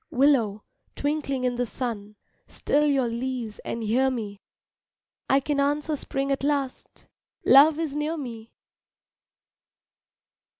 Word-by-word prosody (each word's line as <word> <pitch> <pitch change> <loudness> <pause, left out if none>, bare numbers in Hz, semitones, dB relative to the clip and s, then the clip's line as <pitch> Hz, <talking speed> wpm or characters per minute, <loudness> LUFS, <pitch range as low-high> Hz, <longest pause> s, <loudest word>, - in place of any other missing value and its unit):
Willow, 245 -7 +2 0.3
twinkling 285 -3 -2
in 250 -1 0
the 245 - 0
sun, 215 -4 -5 0.3
Still 295 +1 +1
your 275 -3 +2
leaves 235 -2 -4
and 230 - -5
hear 250 +5 +2
me, 210 -5 -5 0.9
I 270 - +5
can 280 +1 -1
answer 295 +2 0
spring 275 0 -3
at 275 - -1
last, 280 -2 -2 0.4
Love 290 +3 +7
is 315 -3 -3
near 300 +2 -1
me! 230 -5 -7
265 Hz, 120 wpm, -25 LUFS, 235-290 Hz, 0.9 s, Love